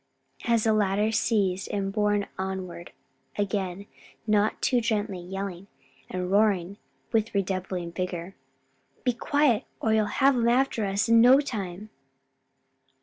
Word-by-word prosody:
as 230 Hz, -2 st, +2 dB
the 220 Hz, -, +3 dB
latter, 210 Hz, +1 st, +1 dB
seized, 200 Hz, -4 st, 0 dB
and 195 Hz, -1 st, -2 dB
borne 205 Hz, -1 st, +1 dB
onward 185 Hz, -2 st, -5 dB, 0.5 s
again, 200 Hz, -2 st, -2 dB, 0.4 s
not 210 Hz, -1 st, +2 dB
too 245 Hz, -2 st, +2 dB
gently, 210 Hz, -5 st, -1 dB
yelled 190 Hz, +1 st, -6 dB, 0.4 s
and 180 Hz, 0 st, -3 dB
roared 200 Hz, -2 st, +2 dB, 0.3 s
with 225 Hz, -2 st, 0 dB
redoubled 185 Hz, -3 st, -2 dB
vigor: 180 Hz, 0 st, -4 dB, 0.7 s
"Be 250 Hz, -, +2 dB
quiet 275 Hz, -1 st, +2 dB, 0.2 s
or 220 Hz, -, +1 dB
you'll 215 Hz, -1 st, +2 dB
have 275 Hz, +3 st, +3 dB
'em 235 Hz, -1 st, +2 dB
after 245 Hz, -3 st, +1 dB
us 200 Hz, +3 st, 0 dB
in 230 Hz, 0 st, +6 dB
no 255 Hz, +3 st, +7 dB
time." 210 Hz, -6 st, -5 dB
205 Hz, 130 wpm, -26 LUFS, 190-225 Hz, 0.7 s, no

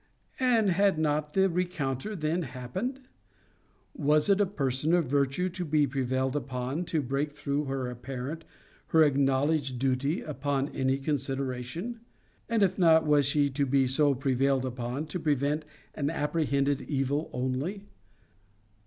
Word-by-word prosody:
And 230 Hz, -6 st, +3 dB
had 195 Hz, 0 st, +3 dB
not 150 Hz, -1 st, 0 dB
the 190 Hz, 0 st, +4 dB
rencounter 175 Hz, -, -2 dB
then 160 Hz, +1 st, -1 dB
happened? 175 Hz, -, -4 dB, 0.9 s
'Was 150 Hz, +3 st, +2 dB
a 200 Hz, +1 st, +4 dB
person 145 Hz, -2 st, 0 dB
of 175 Hz, -3 st, +2 dB
virtue 140 Hz, +6 st, +1 dB
to 180 Hz, 0 st, -4 dB
be 150 Hz, -2 st, +2 dB
prevailed 130 Hz, 0 st, -1 dB
upon 130 Hz, +4 st, -3 dB
to 160 Hz, -3 st, -1 dB
break 140 Hz, +3 st, -1 dB
through 145 Hz, 0 st, -2 dB
her 135 Hz, -2 st, -2 dB
apparent, 130 Hz, +5 st, -6 dB, 0.4 s
her 160 Hz, -1 st, +5 dB
acknowledged 140 Hz, -1 st, +2 dB
duty, 135 Hz, +4 st, 0 dB
upon 140 Hz, -1 st, -2 dB
any 130 Hz, 0 st, 0 dB
consideration?' 135 Hz, -, -3 dB, 0.5 s
And, 225 Hz, -3 st, +3 dB
if 190 Hz, 0 st, +1 dB
not, 160 Hz, -2 st, +5 dB
was 145 Hz, -2 st, +4 dB
she 145 Hz, 0 st, +2 dB
to 140 Hz, +1 st, 0 dB
be 135 Hz, 0 st, +3 dB
so 140 Hz, +2 st, +3 dB
prevailed 135 Hz, 0 st, +1 dB
upon 125 Hz, +3 st, -3 dB
to 155 Hz, +3 st, -5 dB
prevent 150 Hz, 0 st, 0 dB, 0.3 s
an 145 Hz, -1 st, -1 dB
apprehended 145 Hz, -3 st, 0 dB
evil 140 Hz, +2 st, -1 dB
only? 135 Hz, +11 st, -3 dB
145 Hz, 135 wpm, -29 LUFS, 135-160 Hz, 0.9 s, her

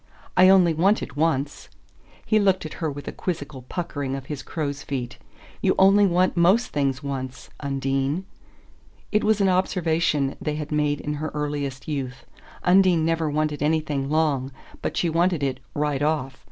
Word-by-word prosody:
"I 185 Hz, 0 st, +7 dB
only 185 Hz, -3 st, +6 dB
want 190 Hz, +7 st, +2 dB
it -, -, -8 dB
once." 145 Hz, -2 st, -1 dB, 0.6 s
He 215 Hz, -, +3 dB
looked 190 Hz, -4 st, +2 dB
at 155 Hz, -, -6 dB
her 160 Hz, -, 0 dB
with 145 Hz, 0 st, -7 dB
a -, -, -2 dB
quizzical 145 Hz, -6 st, -5 dB
puckering 145 Hz, -2 st, -4 dB
of 135 Hz, -1 st, -6 dB
his 145 Hz, -1 st, -5 dB
crows' 145 Hz, -2 st, -4 dB
feet. 125 Hz, -4 st, -5 dB, 0.4 s
"You -, -, +2 dB
only 195 Hz, +1 st, +6 dB
want 180 Hz, +1 st, +2 dB
most 185 Hz, +8 st, +4 dB
things 140 Hz, -1 st, -1 dB
once. 130 Hz, -2 st, -5 dB
Undine." 135 Hz, +4 st, -1 dB, 0.9 s
It 210 Hz, -, +2 dB
was 215 Hz, -1 st, +2 dB
an 195 Hz, -, +4 dB
observation 165 Hz, -6 st, +1 dB
they 150 Hz, -1 st, -2 dB
had 150 Hz, 0 st, -5 dB
made 150 Hz, -1 st, +1 dB
in 150 Hz, -, -3 dB
her 155 Hz, -, -2 dB
earliest 145 Hz, -3 st, -3 dB
youth 135 Hz, -3 st, -4 dB, 0.4 s
Undine 180 Hz, -3 st, +4 dB
never 165 Hz, -1 st, +1 dB
wanted 150 Hz, -1 st, -1 dB
anything 150 Hz, -3 st, 0 dB
long, 145 Hz, -4 st, +1 dB, 0.3 s
but -, -, -3 dB
she 175 Hz, -, +2 dB
wanted 170 Hz, -1 st, +1 dB
it 135 Hz, -2 st, -1 dB, 0.2 s
"right 145 Hz, -2 st, 0 dB
off." 145 Hz, -3 st, -1 dB
150 Hz, 165 wpm, -24 LUFS, 140-175 Hz, 0.9 s, I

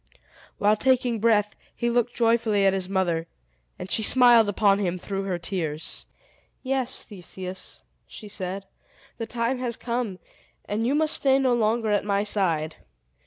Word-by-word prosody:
While 210 Hz, +1 st, +3 dB
taking 250 Hz, -2 st, +2 dB
breath, 210 Hz, -2 st, +2 dB, 0.2 s
he 235 Hz, -, -2 dB
looked 240 Hz, 0 st, 0 dB
joyfully 225 Hz, -3 st, +2 dB
at 195 Hz, -, +4 dB
his 190 Hz, -1 st, -2 dB
mother, 175 Hz, -4 st, 0 dB, 0.5 s
and 185 Hz, -, -8 dB
she -, -, +2 dB
smiled 240 Hz, -1 st, +6 dB
upon 200 Hz, -1 st, +3 dB
him 185 Hz, -3 st, -1 dB
through 195 Hz, +2 st, -4 dB
her 185 Hz, -2 st, -1 dB
tears. 165 Hz, -4 st, -4 dB, 0.6 s
"Yes, 260 Hz, -1 st, 0 dB
Theseus," 185 Hz, -2 st, -8 dB, 0.2 s
she 215 Hz, -, -10 dB
said, 195 Hz, -1 st, -5 dB, 0.5 s
"the 230 Hz, -, -3 dB
time 235 Hz, +2 st, -1 dB
has 245 Hz, -2 st, -3 dB
come, 235 Hz, -5 st, -3 dB, 0.5 s
and 220 Hz, +3 st, -1 dB
you 275 Hz, -, +1 dB
must 310 Hz, 0 st, +3 dB
stay 270 Hz, -1 st, +3 dB
no 260 Hz, -2 st, +2 dB
longer 225 Hz, -1 st, +1 dB
at 205 Hz, -, +2 dB
my 200 Hz, 0 st, 0 dB
side! 170 Hz, -7 st, -1 dB
210 Hz, 155 wpm, -25 LUFS, 190-240 Hz, 0.6 s, smiled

